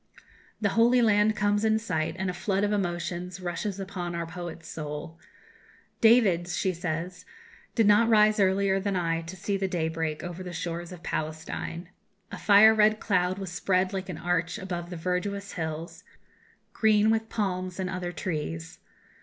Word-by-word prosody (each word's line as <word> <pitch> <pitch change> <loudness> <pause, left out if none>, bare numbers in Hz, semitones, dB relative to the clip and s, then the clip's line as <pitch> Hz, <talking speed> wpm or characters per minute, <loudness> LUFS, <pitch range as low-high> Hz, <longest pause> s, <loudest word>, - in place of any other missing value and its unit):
The 205 - +1
Holy 235 +4 +4
Land 215 -2 +4
comes 205 0 +1
in 220 0 +3
sight, 180 -8 -2
and 190 - -2
a 180 - -1
flood 195 +2 -1
of 205 - +1
emotions 180 -2 -2
rushes 185 +3 -3
upon 185 -3 -4
our 170 0 -2
poet's 170 -1 -8
soul. 155 +2 -6 0.8
"David," 220 -7 +5
she 185 +1 -1
says, 175 +1 -4 0.5
"did 225 - +4
not 210 +3 +5
rise 215 -1 +5
earlier 195 0 +3
than 200 0 -1
I 165 -2 0
to 165 +3 -8
see 195 +2 -2
the 195 0 -1
day 170 -3 -1
break 160 -1 -3
over 175 0 -6
the 180 -1 -6
shores 170 0 -4
of 180 -1 -10
Palestine. 160 +2 -4 0.4
A - - -6
fire 215 +2 +7
red 215 0 +4
cloud 180 -2 +1
was 195 -3 -5
spread 185 +1 +1
like 190 -1 -4
an 175 - -5
arch 175 +1 -1
above 175 -4 -5
the 180 - -6
verdurous 195 +4 -2
hills, 160 -1 -5 0.7
green 215 0 +4
with 225 0 0
palms 185 -3 -2
and 185 - -1
other 180 -1 -3
trees. 150 - -4
185 Hz, 170 wpm, -27 LUFS, 170-205 Hz, 0.8 s, fire